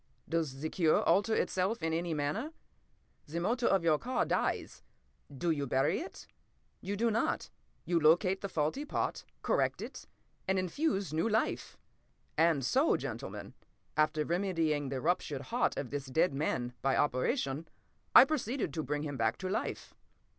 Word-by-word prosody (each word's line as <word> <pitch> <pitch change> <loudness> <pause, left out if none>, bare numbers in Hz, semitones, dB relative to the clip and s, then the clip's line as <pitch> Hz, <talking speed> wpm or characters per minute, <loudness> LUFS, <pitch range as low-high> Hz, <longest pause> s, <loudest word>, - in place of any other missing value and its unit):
Does 155 -5 -2
the 155 - -2
cure 165 -4 +3
alter 205 +6 +3
itself 190 +4 0
in 160 0 0
any 165 0 -1
manner? 175 - -2 0.7
The 165 +3 -3
motor 235 +7 +1
of 195 -3 +3
your 155 -3 +3
car 255 +2 0
dies—do 150 +4 -3
you 145 -3 -1
bury 130 +2 +2
it? 355 - -8 0.6
You 200 +2 -3
do 230 +2 +2
not; 225 - -1 0.3
you 175 -1 +2
locate 175 +5 +4
the 200 - -3
faulty 160 - -1
part, 300 - -2 0.2
correct - - +1
it, - - -8 0.4
and 190 0 +2
infuse 195 - -1
new 165 +8 +1
life. 220 +1 -1 0.6
And 160 -5 +3
so, 275 - +3
gentlemen, - - -6 0.4
after 155 0 +2
remedying 165 -5 0
the 130 -1 -3
ruptured 145 -4 0
heart 245 - +1
of 140 - -4
this 140 -1 -4
dead 160 +5 +2
man, 130 -4 -1
by 135 0 +2
operation, 145 - 0 0.5
I - - +11
proceeded 270 -4 -2
to 160 - -1
bring 145 +2 -2
him 145 -3 -4
back 115 -1 +1
to 185 - -4
life. 195 - -3
165 Hz, 155 wpm, -32 LUFS, 145-200 Hz, 0.7 s, I